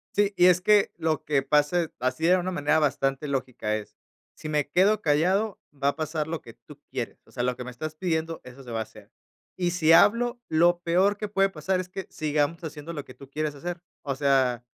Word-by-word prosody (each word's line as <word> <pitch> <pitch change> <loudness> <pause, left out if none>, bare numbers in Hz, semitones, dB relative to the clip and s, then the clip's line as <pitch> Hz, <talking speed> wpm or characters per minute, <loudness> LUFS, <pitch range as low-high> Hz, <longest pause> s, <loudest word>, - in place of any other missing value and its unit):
Sí, 205 0 +3
y 175 - +6
es 180 0 +5
que 210 +1 +4
lo 160 -2 -1
que 145 -2 +2
pase, 150 +4 +2
así 130 +5 -1
de 185 +1 +6
una 185 +1 -2
manera 150 -2 +1
bastante 140 -1 0
lógica 130 -6 -2
es, 105 - -10 0.4
si - - -8
me 150 -2 0
quedo 200 +6 +3
callado, 185 +7 +1
va 140 -1 -2
a - - -3
pasar 155 -1 -2
lo 165 0 -3
que - - -13
tú - - -16
quieres, - - -4
o - - -22
sea, - - -4
lo 125 0 0
que - - -5
me 125 - -7
estás 155 +5 -6
pidiendo, 165 -1 -2
eso 125 +2 -12
se 125 - -12
va 115 - -3
a - - 0
hacer. 110 - -17 0.5
Y 175 -1 0
si 165 -2 +3
hablo, 235 +8 +5
lo 175 +2 +3
peor 185 +4 +2
que 210 0 -4
puede 195 -1 +2
pasar 185 +2 -1
es 185 0 -5
que, 190 0 -6
sigamos 155 +1 -1
haciendo 155 +1 -7
lo 145 -3 -5
que - - -13
tú 140 - -13
quieres 150 +1 -3
hacer. 175 +4 -5 0.2
O 140 -2 -2
sea, 135 -3 +2
155 Hz, 230 wpm, -26 LUFS, 140-180 Hz, 0.5 s, y